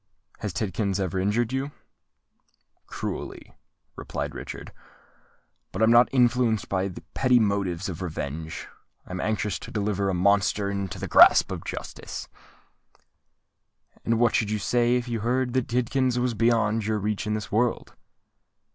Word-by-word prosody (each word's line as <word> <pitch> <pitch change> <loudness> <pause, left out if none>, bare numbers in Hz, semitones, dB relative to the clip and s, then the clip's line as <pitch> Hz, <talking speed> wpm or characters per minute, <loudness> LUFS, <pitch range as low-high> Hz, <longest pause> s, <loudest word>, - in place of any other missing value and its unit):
Has 105 - -3
Tidkins 100 +2 -1
ever 95 -1 -1
injured 110 +5 0
you?" 135 +2 -2 1.2
"Cruelly," - - -6 0.4
replied - - -5
Richard. - - -8 1.0
"But - - -1
I - - +8
am 115 - +4
not 120 +1 +6
influenced 120 -3 +2
by 95 0 0 0.2
petty 130 -2 +3
motives 100 -4 0
of 90 -2 -6
revenge: 80 -2 -5 0.4
I - - -12
am 90 0 -3
anxious 105 -3 -1
to - - -9
deliver 100 -2 -1
a 95 - 0
monster 100 +1 +2
into 100 -3 -4
the - - -4
grasp - - +7
of - - -5
justice." - - -7 1.8
"And 115 0 +1
what 120 -1 +3
should 110 - +1
you 110 - 0
say 120 +4 +2
if 125 0 -1
you 115 -2 -2
heard 125 +3 0
that 130 -1 0
Tidkins 125 +1 0
was 125 0 0
beyond 115 -1 +2
your 110 -1 +1
reach 105 +1 -2
in 105 - 0
this 105 -2 -5
world?" 120 +3 0
110 Hz, 150 wpm, -26 LUFS, 100-120 Hz, 1.8 s, I